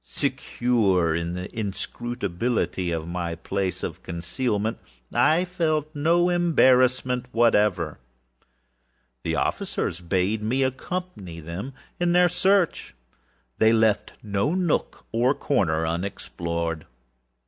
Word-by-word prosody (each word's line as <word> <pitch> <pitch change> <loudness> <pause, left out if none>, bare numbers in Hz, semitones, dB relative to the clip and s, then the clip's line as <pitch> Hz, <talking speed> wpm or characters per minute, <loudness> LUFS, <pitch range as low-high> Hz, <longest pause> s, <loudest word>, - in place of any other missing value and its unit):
Secure, 95 - +1
however, 80 - +1
in 85 +1 -2
the 90 +5 -6
inscrutability 100 -2 -2
of 80 -1 -3
my 85 -1 -3
place 95 +2 -3
of 85 +2 -5
concealment, 105 +6 -2 0.3
I 165 +4 +4
felt 155 -4 -1
no 170 +4 +3
embarrassment 130 -7 +3
whatever. 105 -10 +2 1.2
The - - -1
officers 85 - -1
bade 95 +4 0
me 125 +5 +1
accompany 130 - -4
them 85 - -6 0.3
in 175 0 +2
their 180 0 +5
search. 185 - +1 0.6
They 110 +1 +5
left 110 -2 +2
no 105 - 0
nook 180 -4 -1
or 125 +4 +2
corner 80 - +1
unexplored. 85 -2 -3
110 Hz, 105 wpm, -25 LUFS, 85-135 Hz, 1.2 s, their